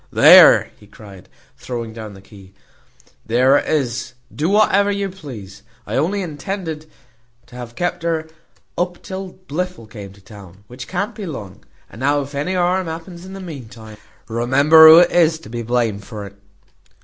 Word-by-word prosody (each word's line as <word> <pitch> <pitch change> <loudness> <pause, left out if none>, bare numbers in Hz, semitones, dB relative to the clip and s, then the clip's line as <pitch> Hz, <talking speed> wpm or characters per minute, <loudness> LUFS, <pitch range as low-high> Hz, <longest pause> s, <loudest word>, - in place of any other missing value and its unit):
"There," - - +7
he 105 - -18
cried, 100 -4 -15 0.3
throwing 115 -3 -6
down 110 -2 -9
the 95 - -15
key, 95 -1 -17 0.7
"there 130 +5 +3
it - - -3
is, 125 -4 -2 0.2
do 155 +4 -1
whatever 205 -1 +3
you 200 -1 -2
please. 130 - -11 0.2
I - - -5
intended 165 0 -3
only - - -29 0.6
to 125 - -17
have 120 -1 -9
kept 175 - -3
her 165 -1 -2 0.5
up 175 0 -3
till 190 -1 -7
Blifil 180 -4 -4
came 105 -3 -11
to 100 - -19
town, 100 -1 -15
which 125 +3 -10
can't 200 +5 -3
be 210 -3 -7
long; 105 - -9 0.2
and - - -14
now 145 +2 +1
if 140 +1 -9
any 150 +7 -3
harm 180 0 0
happens 170 +2 -8
in 190 - -10
the 195 - -8
mean 150 -11 -9
time, 110 -2 -13 0.3
remember 140 +8 +5
who 160 +1 +10
is 170 -2 +3
to 160 - -14
be 120 +1 -5
blamed 115 -3 -1
for 105 -1 -8
it." 100 0 -13
140 Hz, 175 wpm, -19 LUFS, 110-175 Hz, 0.7 s, who